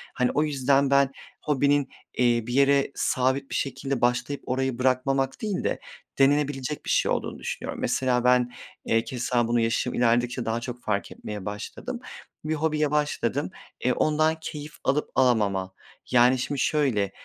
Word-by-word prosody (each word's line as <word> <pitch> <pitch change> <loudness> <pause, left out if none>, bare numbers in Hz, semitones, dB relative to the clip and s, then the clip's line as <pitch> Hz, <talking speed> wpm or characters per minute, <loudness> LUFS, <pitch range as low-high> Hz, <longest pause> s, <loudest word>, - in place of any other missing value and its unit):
Hani, 125 -1 +1
o 150 - +2
yüzden 140 -1 +2
ben 140 -1 +4 0.3
hobinin, 145 -1 +2 0.3
eee, 120 -2 +2
bir 120 - -3
yere 140 0 +3
sabit 130 +2 0
bir - - -2
şekilde 135 -1 -2
başlayıp 125 +4 0
orayı 130 -1 -1
bırakmamak 130 +1 +1
değil 210 -4 -2
de - - 0 0.4
denenebilecek 145 0 +1
bir - - -5
şey - - +2
olduğunu - - -3
düşünüyorum. - - -5
Mesela 125 -2 +1
ben, 125 -1 +3 0.3
eee, 115 0 +2
keza 125 -2 -1
bunu 120 0 +2
yaşım 115 +2 0
ilerledikçe 120 +1 +1
daha 115 +1 -1
çok 125 0 -7
fark 100 -2 -1
etmeye 105 -3 -7
başladım. 105 0 -6 0.5
Bir 155 +1 0
hobiye 150 -1 0
başladım, 145 -2 0 0.4
eee, 125 - +4
ondan 155 +1 +2
keyif 150 -1 -7
alıp 145 +3 +1
alamam 100 -7 +2 0.4
yani 125 +1 +5
şimdi 140 +2 -2
şöyle: 120 -10 +1
130 Hz, 155 wpm, -26 LUFS, 120-140 Hz, 0.5 s, yani